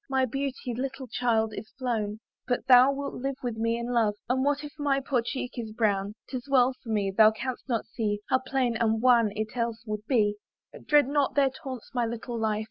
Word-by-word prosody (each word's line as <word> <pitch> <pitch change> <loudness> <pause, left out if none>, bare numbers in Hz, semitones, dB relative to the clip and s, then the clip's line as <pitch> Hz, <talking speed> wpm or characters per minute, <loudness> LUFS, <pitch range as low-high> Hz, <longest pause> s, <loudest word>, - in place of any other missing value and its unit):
My 265 -1 +2
beauty, 265 0 -3
little 270 +2 -4
child, 225 -2 0
is 215 - -7
flown; 220 -5 -2 0.3
But 245 0 -1
thou 255 +1 +7
wilt 280 0 -4
live 270 +2 -3
with 240 -3 -3
me 230 +1 0
in 235 +1 -3
love, 220 -3 +2
And 260 +2 +1
what 290 +1 +1
if 295 - -8
my 280 -2 +2
poor 265 -2 0
cheek 250 +1 -4
be 230 -3 -5
brown? 205 -2 +1
'Tis 255 0 -6
well 260 -1 +4
for 235 - -11
me; 205 -3 0
thou 215 0 +8
canst 250 +4 -5
not 230 -3 0
see 210 -3 -2
How 260 - +3
pale 260 -2 0
and 225 -1 +2
wan 235 -3 +4
it 215 +1 -4
else 235 -1 -2
would 215 0 -5
be. 210 -5 +2 0.5
Dread 295 -3 +5
not 285 -1 +1
their 275 -2 +4
taunts, 260 -2 -8
my 240 -2 +1
little 235 +1 -5
life! 215 -1 0
245 Hz, 215 wpm, -27 LUFS, 220-265 Hz, 0.5 s, thou